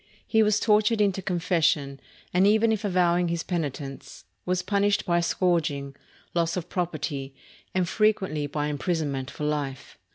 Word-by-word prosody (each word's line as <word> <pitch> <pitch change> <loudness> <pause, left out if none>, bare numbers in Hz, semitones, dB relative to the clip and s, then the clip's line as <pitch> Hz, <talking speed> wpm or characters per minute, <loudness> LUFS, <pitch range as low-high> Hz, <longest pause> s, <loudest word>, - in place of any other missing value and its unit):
He 220 - +3
was 210 -1 +3
tortured 215 +1 +3
into 195 -2 +2
confession, 165 -6 0 0.3
and 185 +2 +4
even 220 +2 +4
if 220 -1 -1
avowing 180 -3 +2
his 170 0 -2
penitence, 145 -5 -5 0.2
was 180 0 0
punished 200 +1 +1
by 175 -2 +2
scourging, 160 -6 0 0.4
loss 170 0 0
of 180 - -5
property, 150 -6 -3 0.4
and 185 -2 +2
frequently 190 -8 +1
by 145 +1 -2
imprisonment 150 -3 -2
for - - -7
life. 145 -3 -3
175 Hz, 140 wpm, -26 LUFS, 150-195 Hz, 0.4 s, and